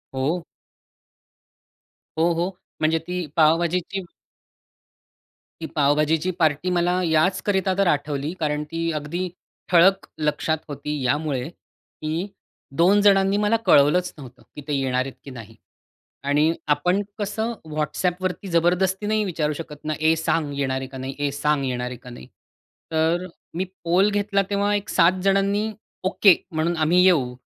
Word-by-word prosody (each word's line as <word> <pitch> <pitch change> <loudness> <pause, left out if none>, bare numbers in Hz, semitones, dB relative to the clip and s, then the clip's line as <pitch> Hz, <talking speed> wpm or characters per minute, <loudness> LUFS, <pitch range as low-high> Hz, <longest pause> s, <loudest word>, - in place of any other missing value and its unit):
हो. 155 +7 -1 1.7
हो, 165 +2 +3
हो. 170 +3 -1 0.3
म्हणजे 160 +1 +3
ती 180 -1 -3
पाव-भाजीची 170 +4 +2 1.6
ती - - -3
पाव-भाजीची 150 +4 +2
पार्टी 160 +2 +1
मला 175 0 +2
याचकरिता 185 +4 +1
तर 195 -2 +3
आठवली, 145 0 -1
कारण 150 -1 -1
ती 165 0 -1
अगदी 170 +5 -4 0.4
ठळक 190 +3 +5
लक्षात 150 +1 0
होती 145 0 -4
यामुळे, 140 -1 -1
की 165 +1 -7 0.5
2 200 +4 +5
जणांनी 195 0 +4
मला 210 +2 +2
कळवलंच 160 +6 +4
नव्हतं, 130 -4 -12
की 150 - -7
ते 150 - -2
येणार 130 -2 0
आहेत 135 - -7
की - - -10
नाही. 115 -3 -11 0.7
आणि 150 +3 +3 0.2
आपण 180 +6 0 0.2
कसं 220 +3 -2 0.2
WhatsAppवरती 180 +5 -2
जबरदस्ती 180 +4 +1
नाही 215 0 +1
विचारू 155 -5 -1
शकत 150 -2 -8
ना? 155 - -1
"ए, 160 +1 +4
सांग 160 -2 -1
येणार 130 -1 0
आहे 130 - -5
का 130 0 -9
नाही? 130 +1 -5
ए 145 -1 0
सांग 145 0 0
येणार 125 -1 -2
आहे 125 - -7
का 125 - -12
नाही"? 65 - -11 0.7
तर 165 +3 +1 0.3
मी 180 +3 -1 0.2
पोल 185 +5 +3
घेतला 200 -1 +1
तेव्हा 205 +1 +1
एक 205 0 -2
7 185 +2 +3
जणांनी 200 +2 +2 0.4
"ओके 195 -1 +6 0.2
म्हणून 165 +1 -1
आम्ही 165 +3 +3
येऊ, 140 -10 +3
165 Hz, 140 wpm, -23 LUFS, 150-185 Hz, 1.7 s, ओके